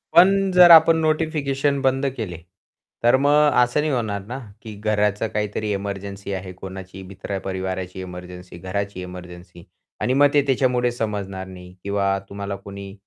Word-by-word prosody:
पण 195 Hz, +2 st, +6 dB
जर 180 Hz, -1 st, +8 dB
आपण 160 Hz, 0 st, +8 dB
नोटिफिकेशन 150 Hz, -3 st, 0 dB
बंद 135 Hz, +1 st, +1 dB
केले, 90 Hz, -7 st, -4 dB, 0.7 s
तर 120 Hz, +2 st, +5 dB
मग 145 Hz, +1 st, +4 dB
असं 125 Hz, +4 st, 0 dB
नाही 155 Hz, -1 st, -1 dB
होणार 105 Hz, -5 st, -2 dB
ना, 125 Hz, +5 st, -6 dB, 0.2 s
की 110 Hz, -2 st, -9 dB
घराचं 105 Hz, 0 st, 0 dB
काहीतरी 105 Hz, 0 st, -2 dB
इमर्जन्सी 100 Hz, 0 st, -5 dB
आहे, 95 Hz, -1 st, -5 dB
कोणाची 95 Hz, +1 st, -9 dB
मित्र-परिवाराची 95 Hz, -1 st, -5 dB
इमर्जन्सी, 90 Hz, 0 st, -9 dB
घराची 95 Hz, +1 st, -4 dB
इमर्जन्सी 90 Hz, -1 st, -10 dB, 0.4 s
आणि 130 Hz, -, +1 dB
मग 145 Hz, +1 st, +6 dB
ते 145 Hz, -, +5 dB
त्याच्यामुळे 125 Hz, -2 st, +1 dB
समजणार 100 Hz, -5 st, -4 dB
नाही 90 Hz, -1 st, -11 dB
किंवा 100 Hz, -1 st, 0 dB
तुम्हाला 100 Hz, 0 st, -5 dB
कोणी 100 Hz, 0 st, -9 dB
100 Hz, 140 wpm, -22 LUFS, 95-135 Hz, 0.7 s, जर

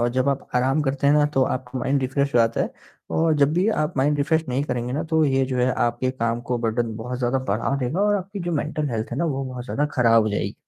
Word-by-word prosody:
और 120 Hz, -, +2 dB
जब 130 Hz, +2 st, 0 dB
आप 140 Hz, -1 st, -2 dB
आराम 130 Hz, +4 st, +2 dB
करते 135 Hz, 0 st, -1 dB
हैं 145 Hz, -, +5 dB
ना 150 Hz, 0 st, +4 dB
तो 135 Hz, -, +4 dB
आपका 130 Hz, 0 st, -3 dB
माइंड 135 Hz, +2 st, 0 dB
रिफ़्रेश 140 Hz, +1 st, -1 dB
हो -, -, +5 dB
जाता 115 Hz, 0 st, +2 dB
है -, -, -1 dB, 0.4 s
और 160 Hz, 0 st, +2 dB
जब 145 Hz, 0 st, +3 dB
भी 180 Hz, +4 st, +2 dB
आप 155 Hz, -6 st, -1 dB
माइंड 145 Hz, +2 st, +2 dB
रिफ़्रेश 160 Hz, +3 st, +1 dB
नहीं 130 Hz, +2 st, 0 dB
करेंगे 125 Hz, -3 st, -3 dB
ना 145 Hz, -, -1 dB
तो 160 Hz, -1 st, +3 dB
ये 135 Hz, -2 st, +2 dB
जो 130 Hz, -1 st, -3 dB
है 125 Hz, +1 st, +2 dB
आपके 120 Hz, +2 st, 0 dB
काम 115 Hz, -2 st, -2 dB
को 125 Hz, -, +1 dB
बर्डन 115 Hz, 0 st, -1 dB
बहुत 125 Hz, +3 st, -5 dB
ज़्यादा 125 Hz, +1 st, +1 dB
बढ़ा 110 Hz, +7 st, 0 dB
देगा। 130 Hz, +9 st, -1 dB
और 205 Hz, 0 st, +3 dB
आपकी 195 Hz, +1 st, -6 dB
जो 175 Hz, -1 st, -3 dB
मेंटल 150 Hz, 0 st, -1 dB
हेल्थ 110 Hz, -1 st, -3 dB
है -, -, -3 dB
ना 170 Hz, -, +1 dB
वो 135 Hz, -4 st, -1 dB
बहुत 125 Hz, -2 st, -6 dB
ज़्यादा 145 Hz, +3 st, -1 dB
खराब 115 Hz, -3 st, +4 dB
हो 110 Hz, -, 0 dB
जाएगी 105 Hz, -, -2 dB
135 Hz, 270 wpm, -23 LUFS, 120-150 Hz, 0.4 s, हैं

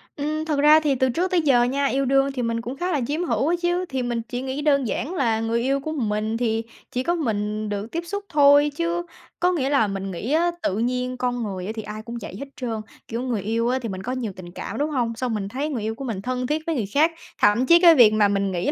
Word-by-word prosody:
Ừm, 305 Hz, +2 st, -2 dB
thực 300 Hz, -3 st, 0 dB
ra 300 Hz, +2 st, +7 dB
thì 295 Hz, -3 st, +1 dB
từ 260 Hz, 0 st, +2 dB
trước 355 Hz, +9 st, -1 dB
tới 360 Hz, -2 st, +3 dB
giờ 265 Hz, -6 st, +4 dB
nha, 275 Hz, +3 st, 0 dB
yêu 275 Hz, 0 st, +1 dB
đương 270 Hz, +1 st, +3 dB
thì 265 Hz, -2 st, -3 dB
mình 230 Hz, -1 st, -1 dB
cũng 245 Hz, +3 st, -5 dB
khá 360 Hz, +4 st, -2 dB
là 295 Hz, -5 st, 0 dB
chiếm 310 Hz, +5 st, -1 dB
hữu 305 Hz, -4 st, 0 dB
á 340 Hz, -, +3 dB
chứ, 350 Hz, +1 st, 0 dB
thì 265 Hz, -1 st, -2 dB
mình 240 Hz, -1 st, -2 dB
chỉ 245 Hz, 0 st, -3 dB
nghĩ 265 Hz, +2 st, -3 dB
đơn 280 Hz, -4 st, +2 dB
giản 280 Hz, +9 st, -3 dB
là 230 Hz, -8 st, +1 dB
người 225 Hz, +1 st, 0 dB
yêu 270 Hz, +3 st, +1 dB
của 310 Hz, +3 st, -5 dB
mình 220 Hz, -5 st, -1 dB
thì 225 Hz, -1 st, 0 dB, 0.3 s
chỉ 250 Hz, -, -1 dB
có 345 Hz, +5 st, +1 dB
mình 215 Hz, -7 st, -2 dB
được 205 Hz, +2 st, -4 dB
tiếp 335 Hz, +1 st, -3 dB
xúc 405 Hz, +4 st, -4 dB
thôi 290 Hz, -1 st, +5 dB
chứ, 340 Hz, +2 st, -1 dB, 0.4 s
có 360 Hz, -, +3 dB
nghĩa 280 Hz, -7 st, 0 dB
là 275 Hz, -7 st, +3 dB
mình 195 Hz, -1 st, -4 dB
nghĩ 195 Hz, +8 st, -4 dB
á, 340 Hz, +3 st, +3 dB
tự 190 Hz, -, 0 dB
nhiên 250 Hz, +2 st, -1 dB
con 245 Hz, -1 st, -1 dB
người 195 Hz, 0 st, -4 dB
thì 225 Hz, -, -5 dB
ai 215 Hz, +1 st, -7 dB
cũng 235 Hz, +2 st, -7 dB
vậy 195 Hz, -, -7 dB
hết 280 Hz, -, -5 dB
trơn, 230 Hz, -4 st, -3 dB, 0.3 s
kiểu, 230 Hz, +1 st, -3 dB
người 245 Hz, -5 st, -2 dB
yêu 230 Hz, +4 st, 0 dB
á 260 Hz, +1 st, +1 dB
thì 230 Hz, -, -4 dB
mình 190 Hz, -1 st, -5 dB
có 250 Hz, -, -3 dB
nhiều 250 Hz, -5 st, -3 dB
tình 175 Hz, -2 st, -10 dB
cảm, -, -, -6 dB
đúng 295 Hz, +2 st, 0 dB
hông? 245 Hz, -6 st, -1 dB
Xong 245 Hz, 0 st, -2 dB
mình 205 Hz, -2 st, -2 dB
thấy 270 Hz, +8 st, -3 dB
người 255 Hz, -7 st, -3 dB
yêu 220 Hz, +1 st, -2 dB
của 275 Hz, -, -7 dB
mình 220 Hz, -6 st, -3 dB
thân 250 Hz, +3 st, -2 dB
thiết 305 Hz, +3 st, 0 dB
với 330 Hz, -, 0 dB
người 230 Hz, -7 st, -1 dB
khác, 310 Hz, +4 st, +4 dB, 0.3 s
thậm 210 Hz, +5 st, +4 dB
chí 340 Hz, +4 st, +7 dB
cái 340 Hz, -2 st, +8 dB
việc 230 Hz, -6 st, +7 dB
mà 215 Hz, -1 st, +4 dB
mình 200 Hz, -1 st, 0 dB
nghĩ 180 Hz, +9 st, -1 dB
250 Hz, 280 wpm, -23 LUFS, 220-295 Hz, 0.4 s, cái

